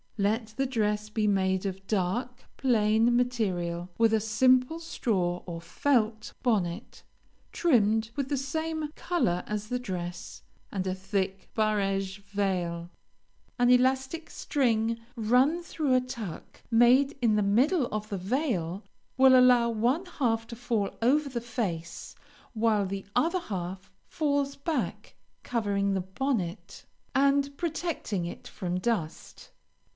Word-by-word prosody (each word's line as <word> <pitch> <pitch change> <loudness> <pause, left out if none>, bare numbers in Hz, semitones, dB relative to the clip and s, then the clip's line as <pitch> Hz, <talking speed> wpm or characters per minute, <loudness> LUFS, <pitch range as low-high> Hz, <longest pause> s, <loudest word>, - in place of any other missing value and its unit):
Let 215 +2 0
the 270 0 +1
dress 210 -4 -1
be 215 0 -1
made 190 -2 +1
of 195 0 -4
dark, 230 +6 -1
plain 225 -1 +3
material, 185 -8 -1
with 225 -1 +4
a 220 - +4
simple 255 +7 +3
straw 185 - -1
or 165 -1 -5
felt 220 0 0
bonnet, 205 -4 -1 0.5
trimmed 220 -8 +2
with 275 -2 -2
the 285 - 0
same 315 +2 -3
color 180 - 0
as 210 0 -3
the 250 - -1
dress, 175 -6 -6 0.3
and 190 -2 -2
a 185 - 0
thick 190 0 -3
barege 195 -3 0
veil. 180 -4 -2 0.7
An 245 -1 +3
elastic 265 +5 +2
string 230 -4 0 0.2
run 255 +9 +2
through 300 -5 0
a 255 - +4
tuck 235 -9 -8
made 250 +5 +5
in 225 -3 +3
the 210 - +2
middle 255 - +3
of 215 0 -4
the 200 - -2
veil, 195 - -1 0.3
will 260 0 +7
allow 250 -2 +6
one 240 - +1
half 225 -4 +1
to 235 - -7
fall 225 -4 -1
over 280 +5 +3
the 240 -3 -3
face, 200 -9 -4 0.4
while 215 -3 +2
the 195 0 -5
other 330 +8 +2
half 190 - -6 0.2
falls 285 -2 0
back, 310 +3 -3 0.3
covering 200 -4 0
the 190 - 0
bonnet, 190 -1 -3 0.3
and 280 +1 +3
protecting 320 - -2
it 170 - -8
from 180 -1 -3
dust. 190 -7 -3
225 Hz, 130 wpm, -28 LUFS, 195-260 Hz, 0.7 s, will